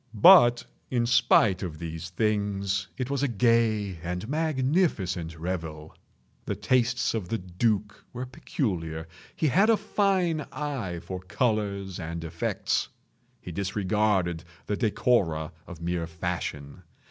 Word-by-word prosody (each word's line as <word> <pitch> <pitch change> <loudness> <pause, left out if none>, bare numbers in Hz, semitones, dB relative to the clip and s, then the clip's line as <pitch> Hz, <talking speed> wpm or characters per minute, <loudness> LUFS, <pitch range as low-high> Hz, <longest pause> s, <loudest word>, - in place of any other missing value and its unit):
But, 120 - +7 0.2
in 120 -2 +1
spite 115 -5 +4
of 85 -5 -5
these 80 +1 -6
things, 100 -1 0
it 130 0 -3
was 140 -1 0
a 145 - +2
gay 110 -5 +2
and 90 +4 -4
magnificent 130 - 0
revel. 80 -3 -5 0.5
The - - -2
tastes 125 -1 +1
of 105 -6 -3
the 115 - 0
duke 105 +3 -1
were 125 +1 -5
peculiar. 85 - -3 0.3
He 155 - +1
had 195 - +4
a 225 - +5
fine 190 -7 +1
eye 125 - -4
for 95 -1 -5
colors 100 -2 -1
and 85 -1 -5
effects. 80 0 -1 0.5
He 90 - -7
disregarded 95 -2 0 0.2
the 105 - -1
decora 100 - +1 0.2
of 85 -2 -10
mere 85 -1 -2
fashion. 80 -1 -4
100 Hz, 125 wpm, -27 LUFS, 85-125 Hz, 0.5 s, But